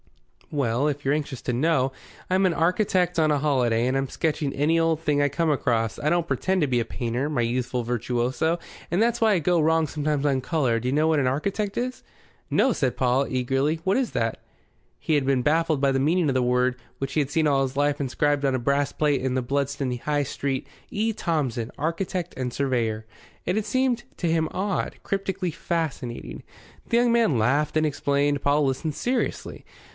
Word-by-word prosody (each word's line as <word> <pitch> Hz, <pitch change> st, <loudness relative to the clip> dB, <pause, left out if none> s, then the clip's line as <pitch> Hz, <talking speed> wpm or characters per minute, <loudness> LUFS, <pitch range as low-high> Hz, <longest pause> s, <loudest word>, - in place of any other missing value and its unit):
"Well, 135 Hz, -2 st, 0 dB
if 145 Hz, -1 st, -5 dB
you're 135 Hz, -, +3 dB
anxious 145 Hz, -4 st, -3 dB
to 125 Hz, -, -1 dB
know, 135 Hz, 0 st, +1 dB, 0.4 s
I'm 190 Hz, +1 st, +3 dB
an 170 Hz, -, 0 dB
architect 180 Hz, +1 st, +1 dB
on 155 Hz, -1 st, +3 dB
a 145 Hz, -, +3 dB
holiday, 125 Hz, -5 st, +1 dB
and 130 Hz, -, 0 dB
I'm 135 Hz, -1 st, -1 dB
sketching 150 Hz, -2 st, -1 dB
any 150 Hz, +5 st, +1 dB
old 165 Hz, -1 st, +2 dB
thing 150 Hz, -3 st, +1 dB
I 145 Hz, -, +3 dB
come 165 Hz, +2 st, 0 dB
across. 115 Hz, -6 st, 0 dB
I 150 Hz, -, 0 dB
don't 170 Hz, 0 st, +1 dB
pretend 190 Hz, +2 st, 0 dB
to 150 Hz, -, +2 dB
be 125 Hz, -2 st, +1 dB
a -, -, -2 dB
painter, 120 Hz, +5 st, -2 dB
my 145 Hz, -5 st, -1 dB
youthful 125 Hz, +1 st, -1 dB
virtuoso, 125 Hz, +7 st, 0 dB, 0.3 s
and 175 Hz, +5 st, +1 dB
that's 235 Hz, 0 st, +1 dB
why 220 Hz, -2 st, +5 dB
I 185 Hz, -, +2 dB
go 170 Hz, +1 st, +2 dB
wrong 160 Hz, 0 st, +3 dB
sometimes 150 Hz, -1 st, -1 dB
on 135 Hz, -2 st, +2 dB
colour. 130 Hz, -5 st, +1 dB
Do 125 Hz, +2 st, -2 dB
you -, -, 0 dB
know 155 Hz, +3 st, +2 dB
what 160 Hz, -2 st, +3 dB
an 130 Hz, -, +1 dB
architect 195 Hz, +10 st, -1 dB
is?" 255 Hz, +1 st, -3 dB, 0.5 s
"No," 265 Hz, -, +3 dB
said 130 Hz, -8 st, -1 dB
Paul, 130 Hz, +2 st, +2 dB
eagerly. 135 Hz, +5 st, 0 dB
"What 190 Hz, -, +2 dB
is 260 Hz, -2 st, 0 dB
it?" -, -, -1 dB, 0.6 s
He 160 Hz, -, -1 dB
had 145 Hz, -2 st, +3 dB
been 135 Hz, -2 st, +2 dB
baffled 155 Hz, +1 st, +2 dB
by 135 Hz, 0 st, +2 dB
the 135 Hz, -, +1 dB
meaning 160 Hz, +4 st, +2 dB
of -, -, +1 dB
the 130 Hz, -, +2 dB
word, 125 Hz, +1 st, +2 dB, 0.2 s
which 135 Hz, 0 st, -4 dB
he 155 Hz, -, +2 dB
had 140 Hz, -, -2 dB
seen 160 Hz, 0 st, +2 dB
all 140 Hz, -2 st, +3 dB
his 135 Hz, 0 st, -2 dB
life, 145 Hz, 0 st, +1 dB
inscribed 145 Hz, +2 st, 0 dB
on 135 Hz, -2 st, +2 dB
a -, -, 0 dB
brass 140 Hz, +3 st, +1 dB
plate 145 Hz, -4 st, +1 dB
in 130 Hz, 0 st, -1 dB
the 130 Hz, -, 0 dB
Bludston 140 Hz, 0 st, -1 dB
High 145 Hz, +2 st, 0 dB
Street: 135 Hz, 0 st, -3 dB, 0.2 s
"E. 220 Hz, +2 st, -1 dB
Thomson, 130 Hz, -, -2 dB
Architect 175 Hz, +2 st, -2 dB
& 125 Hz, -, -2 dB
Surveyor." 120 Hz, -5 st, -1 dB, 0.4 s
It 180 Hz, -, 0 dB
had 215 Hz, -1 st, 0 dB
seemed 245 Hz, +1 st, +1 dB
to 175 Hz, -, -1 dB
him 160 Hz, -1 st, +1 dB
odd, 195 Hz, 0 st, -2 dB
cryptically 190 Hz, -2 st, -2 dB
fascinating. 150 Hz, -7 st, -4 dB, 0.5 s
The 235 Hz, -, +3 dB
young 240 Hz, 0 st, +3 dB
man 225 Hz, -, +3 dB
laughed 140 Hz, +8 st, +1 dB
and 155 Hz, -, +3 dB
explained; 145 Hz, -1 st, 0 dB
Paul 145 Hz, +1 st, +2 dB
listened 140 Hz, +3 st, -2 dB
seriously. 250 Hz, 0 st, -2 dB
145 Hz, 205 wpm, -25 LUFS, 130-165 Hz, 0.6 s, why